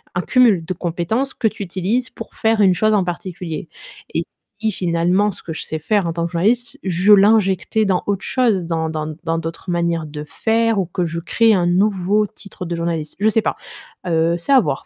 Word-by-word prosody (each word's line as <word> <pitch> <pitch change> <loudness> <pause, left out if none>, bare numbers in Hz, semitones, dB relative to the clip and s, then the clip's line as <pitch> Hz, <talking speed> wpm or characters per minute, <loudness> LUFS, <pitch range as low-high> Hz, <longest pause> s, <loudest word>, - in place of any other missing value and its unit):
un 175 - +1
cumul 230 -9 +3
de 185 - -2
compétences 175 +11 -2
que 225 - +1
tu 210 -1 -4
utilises 195 +8 -1
pour - - -10
faire 220 -1 +2
une 190 -2 +5
chose 215 +5 +2
en 205 -3 +3
particulier. 175 -2 -5 0.5
Et 165 - +2 0.4
si 220 -1 +1
finalement 180 +3 +1
ce - - -12
que 165 - -5
je - - -5
sais 155 - -4
faire 200 +5 +1
en 165 - -2
tant 170 0 -2
que 170 - -5
journaliste, 230 +8 +1
je 185 +2 +4
l'injectais 205 0 +3
dans 185 -2 +1
autre 200 -1 -1
chose 225 -9 +1
dans 165 -1 -1
dans 155 -1 -4
dans 165 0 -1
d'autres 165 +2 -5
manières 170 -2 0
de 150 0 -7
faire 225 +6 +1
ou 190 - 0
que 180 0 -2
je 165 0 -3
crée 225 +6 +3
un 180 -4 +2
nouveau 195 +2 +2
titre 200 -2 -9
de 170 0 -3
journaliste?» 165 -2 -3
Je 215 - +3
sais 225 +1 +2
pas. - - -1 0.5
Heu, 165 0 +2
c'est 170 - -4
à 265 - +8
voir, 145 -6 -3
185 Hz, 215 wpm, -19 LUFS, 170-215 Hz, 0.5 s, à